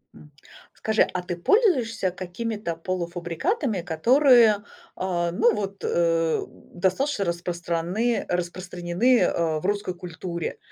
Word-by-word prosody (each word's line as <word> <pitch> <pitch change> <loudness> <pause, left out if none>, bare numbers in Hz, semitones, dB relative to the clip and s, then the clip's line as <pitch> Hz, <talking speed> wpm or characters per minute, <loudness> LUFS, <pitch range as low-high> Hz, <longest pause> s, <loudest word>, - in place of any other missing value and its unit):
М. 150 - -16 0.4
Скажи, 220 0 +2
а 180 - -1
ты 180 0 -4
пользуешься 235 - +2
какими-то 185 +1 -4
полуфабрикатами, 180 - -2
которые, 235 - +5 0.4
э, 175 -2 -1
ну, 230 +7 +3
вот, 200 -1 -5
э, 165 -1 +1 0.3
достаточно 200 +7 0
распраны 175 +5 -1
распространены, 180 +6 0
э, 160 -2 +1
в 155 - -9
русской 205 -1 -1
культуре? 175 -1 -5
180 Hz, 105 wpm, -25 LUFS, 170-225 Hz, 0.4 s, которые